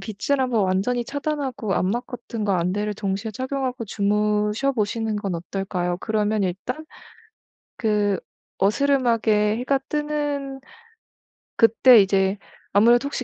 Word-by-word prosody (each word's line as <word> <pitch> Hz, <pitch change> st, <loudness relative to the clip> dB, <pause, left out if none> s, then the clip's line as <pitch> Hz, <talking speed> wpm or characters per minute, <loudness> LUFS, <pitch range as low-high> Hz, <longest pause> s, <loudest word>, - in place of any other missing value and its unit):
빛을 215 Hz, +8 st, -2 dB
한번 245 Hz, -5 st, +1 dB
완전히 200 Hz, +7 st, 0 dB
차단하고 275 Hz, -7 st, -3 dB
암막 235 Hz, +7 st, -1 dB
커튼과 215 Hz, -6 st, -3 dB
안대를 205 Hz, +5 st, -1 dB
동시에 200 Hz, +1 st, -3 dB
착용하고 260 Hz, +1 st, -3 dB
주무셔 210 Hz, +5 st, 0 dB
보시는 220 Hz, -1 st, -1 dB
건 200 Hz, -3 st, -3 dB
어떨까요? 180 Hz, 0 st, -3 dB
그러면 215 Hz, -1 st, 0 dB
일단 200 Hz, -, -3 dB, 0.9 s
그 210 Hz, -3 st, +1 dB, 0.4 s
어스름하게 225 Hz, -2 st, +2 dB
해가 270 Hz, +2 st, +1 dB
뜨는 290 Hz, -2 st, -2 dB, 1.0 s
그때 230 Hz, +1 st, +7 dB
이제 195 Hz, 0 st, +1 dB, 0.4 s
아무래도 235 Hz, +5 st, +5 dB
혹시 275 Hz, -2 st, -4 dB
220 Hz, 280 characters per minute, -23 LUFS, 200-255 Hz, 1.0 s, 그때